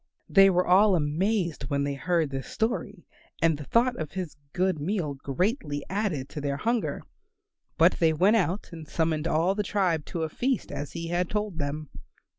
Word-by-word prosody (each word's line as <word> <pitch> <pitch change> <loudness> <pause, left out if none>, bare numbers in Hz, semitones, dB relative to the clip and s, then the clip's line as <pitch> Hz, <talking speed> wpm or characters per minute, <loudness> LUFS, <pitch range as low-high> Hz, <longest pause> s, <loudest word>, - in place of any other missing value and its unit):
They 195 0 +7
were 180 -1 +2
all 195 +2 +5
amazed 170 - 0
when 140 0 0
they 140 0 -1
heard 160 +2 0
his 135 0 -4
story, 210 -4 -2 0.3
and 165 -1 +3
the 145 0 -8
thought 240 - +2
of 155 -2 -5
his 185 -5 -4 0.2
good 185 -1 0
meal 160 -2 -1
greatly 145 - -2
added 190 -10 -1
to 150 - -6
their 140 -1 -1
hunger. 230 +8 -1 0.7
But - - +4
they 165 -3 +4
went 190 +8 +4
out 190 0 -1
and 160 -2 -9
summoned 160 -1 0
all 170 +4 +2
the 210 - -1
tribe 185 -6 0
to 165 - -3
a - - 0
feast 255 - -1
as 145 0 -5
he 165 -1 -5
had 175 +1 0
told 210 -5 -2
them. 145 +1 -3
170 Hz, 185 wpm, -27 LUFS, 150-195 Hz, 0.7 s, They